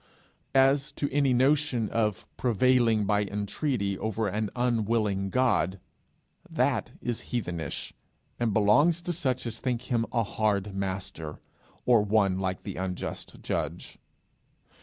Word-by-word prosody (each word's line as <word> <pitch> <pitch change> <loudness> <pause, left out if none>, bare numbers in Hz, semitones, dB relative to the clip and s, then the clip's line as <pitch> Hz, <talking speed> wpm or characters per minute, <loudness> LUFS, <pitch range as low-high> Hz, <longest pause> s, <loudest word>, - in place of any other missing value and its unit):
As 135 +2 +4
to 145 - -1
any 140 -2 +3
notion 130 -2 +2
of 105 -4 -1
prevailing 120 -2 +3
by 105 0 +2
entreaty 100 +1 -2
over 110 0 -1
an 105 +2 -1
unwilling 110 -5 +1
God, 95 -7 +1 0.7
that - - 0
is 120 -2 -2
heathenish, 90 -9 -3 0.5
and 120 -2 +1
belongs 145 - +4
to 175 - -2
such 130 -6 -1
as 115 -1 -4
think 125 -2 -2
him 115 -1 +1
a 115 -2 +2
hard 105 -2 0
master, 95 -5 -4 0.5
or 120 -3 +5
one 100 -2 +2
like 95 -1 -2
the 100 - -6
unjust 90 -1 -5
judge. - - -3
110 Hz, 125 wpm, -28 LUFS, 100-125 Hz, 0.7 s, or